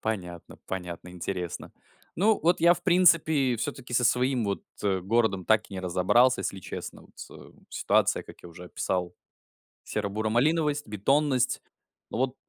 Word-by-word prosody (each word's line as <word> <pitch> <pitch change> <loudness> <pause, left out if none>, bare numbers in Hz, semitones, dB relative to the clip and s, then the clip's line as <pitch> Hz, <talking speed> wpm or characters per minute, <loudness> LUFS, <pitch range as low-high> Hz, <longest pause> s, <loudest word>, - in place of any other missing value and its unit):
Понятно 90 -6 -5
понятно, 90 -2 -6
интересно. 90 0 -5 0.5
Ну, 210 +5 +3
вот 170 +3 +2
я, 170 +1 +6
в 175 - -8
принципе, 160 -8 +4
всё-таки 120 +2 -5
со 125 - +3
своим, 125 0 +2
вот, 100 -1 -2 0.2
э, 95 -2 0
городом 100 -1 0
так 110 -1 +2
и - - -8
не 95 - -4
разобрался, 95 +8 +3
если 95 - -4
честно. - - -8
Вот - - -20
с - - -10
э, - - -14 0.2
ситуация, - - +1
как - - -15
я 85 - -10
уже 90 +2 -11
описал, 90 0 -3 0.7
серо-буро-малиновость, 120 +9 0
бетонность. 130 +5 +1 0.5
Вот 130 +2 -1
110 Hz, 150 wpm, -27 LUFS, 95-140 Hz, 0.7 s, я